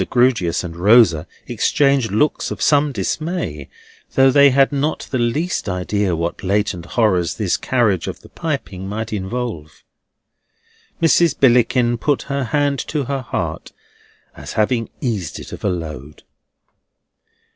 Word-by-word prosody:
Grewgious 115 -10 +2
and 85 -2 -7
Rosa 90 -4 +4 0.2
exchanged 140 -6 +1
looks 130 +9 +1
of - - -6
some 145 0 +3
dismay, 135 - -3 0.5
though 135 0 +5
they 140 +1 +6
had 135 +1 +3
not 145 +2 -2
the 130 - 0
least 140 - -1
idea 90 0 -1
what 85 +1 -3
latent 95 -3 -1
horrors 95 -7 +2
this - - 0
carriage 110 -9 0
of - - -6
the - - -16
piping 105 - -4
might 110 +2 -4
involve. 95 - -5 1.2
Mrs. 165 0 +3
Billickin 120 -1 +3
put 145 +2 0
her 140 -1 -2
hand 145 +2 0
to 150 -2 -2
her 135 +1 -3
heart, 125 - -4 0.6
as - - -8
having 115 +1 0
eased 105 - -3
it - - -10
of - - -9
a - - +1
load. 75 -5 -6
120 Hz, 135 wpm, -19 LUFS, 95-140 Hz, 1.2 s, they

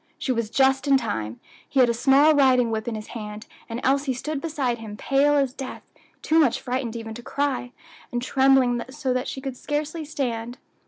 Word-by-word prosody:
She 265 - -2
was 230 -3 -1
just 265 +3 +2
in 275 -1 +6
time; 115 - -4 0.3
he 275 - +1
had 250 - +6
a 235 - +1
small 275 +6 +5
riding 255 -5 +4
whip 220 0 -3
in 235 - -2
his 215 0 -7
hand, 210 -1 -7 0.2
and 230 +1 -4
Elsie 275 0 +1
stood 300 +3 -4
beside 275 -7 -1
him 215 -2 -8
pale 280 +4 +2
as 275 -3 +1
death, 265 -1 -7 0.4
too 320 +1 +3
much 285 -7 +3
frightened 250 -2 -3
even 225 -1 -6
to 240 - -8
cry, 265 -1 -2 0.4
and 240 - -1
trembling 260 -1 +3
so 265 -1 -2
that 255 0 -1
she 265 - -5
could 265 -2 -5
scarcely 300 +4 -3
stand. 245 -5 -3
260 Hz, 200 wpm, -24 LUFS, 235-275 Hz, 0.4 s, in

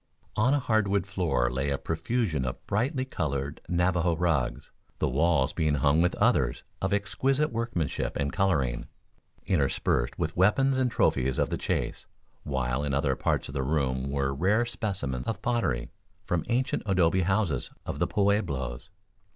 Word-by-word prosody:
On 125 +5 +3
a 145 - +4
hardwood 100 -6 +1
floor 90 -11 0
lay 65 +3 -1
a 70 - 0
profusion 85 - -1
of 65 -1 -5
brightly 130 +6 0
colored 70 - -3
Navajo 90 -1 +2
rugs, 80 -8 -1 0.3
the - - +1
walls 75 0 +2
being 75 -2 +1
hung 70 +3 +3
with 90 - +2
others - - +2 0.2
of 95 - 0
exquisite 130 +9 +1
workmanship 115 - -2
and 70 -1 -1
coloring, 70 -11 +1 0.6
interspersed 70 -7 +1
with 80 - -2
weapons 130 +9 +3
and 130 -1 +2
trophies 65 - +1
of - - 0
the - - +1
chase, - - -2 0.3
while 65 0 -1
in 70 -2 -1
other 70 -1 +1
parts - - 0
of 70 - -8
the 70 - -1
room 65 -2 0
were 70 -1 0
rare 100 - +2
specimens 95 - -2
of 110 -4 -3
pottery 115 - 0 0.3
from 85 -2 -1
ancient 125 +2 +1
adobe 95 -1 +3
houses 95 - 0 0.2
of - - -4
the - - +2
Pueblos. 95 - 0
85 Hz, 155 wpm, -28 LUFS, 70-105 Hz, 0.6 s, a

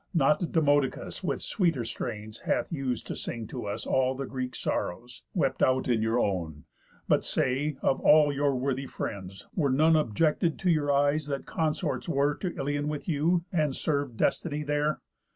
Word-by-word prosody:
Not 165 +6 +4
Demodocus 145 -6 +1
With - - -2
sweeter 165 - 0
strains 110 -1 -5
hath - - -1
us'd 130 -6 -2
to - - -5
sing 115 -2 -5
to - - -5
us 100 - -4
All 130 0 +2
the 135 +1 -4
Greek 130 -1 -4
sorrows, 120 +8 -3
wept - - 0
out 130 0 +3
in 120 -3 +2
your 110 +2 +1
own. 85 - -2 0.4
But - - +3
say: 135 +3 0
Of 135 - +2
all 150 -1 +6
your 140 -1 +1
worthy 135 +1 -1
friends, 95 -4 -6
were 150 -6 +1
none 155 +5 +4
Objected 155 - +1
to 185 -2 +2
your 145 -3 +2
eyes 145 +2 +2
that 140 -1 -3
consorts 160 +1 -1
were 145 -1 +2
To 180 +3 -5
Ilion 145 +1 -1
with 150 -1 -4
you, 170 +2 +1
and 150 -5 +1
serv'd 140 -6 -1
destiny 150 +4 0
there? 150 0 0
140 Hz, 170 wpm, -28 LUFS, 125-155 Hz, 0.4 s, all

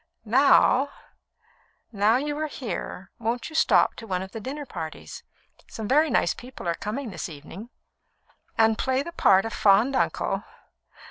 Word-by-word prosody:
Now 265 +3 +4 0.5
" - - -35 0.3
"Now 210 +1 +3
you 290 +2 -2
are 310 - -1
here, 215 -7 -6
won't 235 +5 -3
you - - -10
stop - - +4
to 225 - -9
one 185 -2 -2
of 190 - -10
the 225 - -6
dinner 285 +6 -6
parties? 160 - -8 0.5
Some 220 -2 -6
very 300 +5 +3
nice 175 - +2
people 250 -7 -10
are 170 - +1
coming 220 +7 -5
this 185 - -5
evening." 165 +9 -10 0.9
"And 225 0 +3
play 260 +1 0
the 340 - -7
part 195 - +4
of 225 - -4
fond 210 +7 +4
uncle? - - 0
225 Hz, 160 wpm, -25 LUFS, 195-270 Hz, 0.9 s, Now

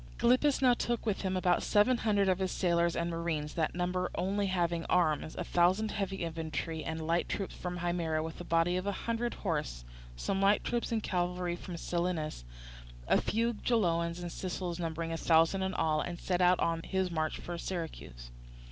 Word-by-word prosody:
Gylippus 255 +4 +3
now 250 -1 +7
took 240 -1 -1
with 210 -3 0
him 190 -1 -1
about 180 -1 +2
seven 235 +4 +3
hundred 205 -3 +2
of 185 -1 +2
his 190 -1 0
sailors 170 -2 +2
and 170 - 0
marines, 165 -3 -2
that 160 -1 -1
number 180 +1 -1
only 195 +3 0
having 170 -3 0
arms, 160 -3 +1
a - - -3
thousand 185 +6 +2
heavy 195 -3 -2
infantry 160 -1 -3
and 160 0 -4
light 170 +2 +1
troops 195 - -3
from 180 0 -4
Himera 170 -3 -1
with 160 +1 -6
a - - -5
body 170 +1 +2
of 185 +2 -3
a - - +2
hundred 235 +1 -1
horse, 150 - -3 0.3
some 195 - -1
light 200 +1 +4
troops 240 0 -1
and 225 -2 0
cavalry 180 -1 -1
from 175 0 -7
Selinus, 170 - -2 0.6
a - - +4
few 230 +2 0
Geloans, 170 -7 +1
and 175 -1 -5
Sicels 180 -1 -4
numbering 165 0 -3
a 165 - -2
thousand 165 +4 +3
in 190 -1 -1
all, 155 -1 +1
and 175 0 -5
set 180 -1 0
out 180 0 +5
on 165 0 +1
his 190 0 -1
march 155 -1 -1
for 175 - -6
Syracuse. 105 - -6
175 Hz, 190 wpm, -32 LUFS, 165-195 Hz, 0.6 s, now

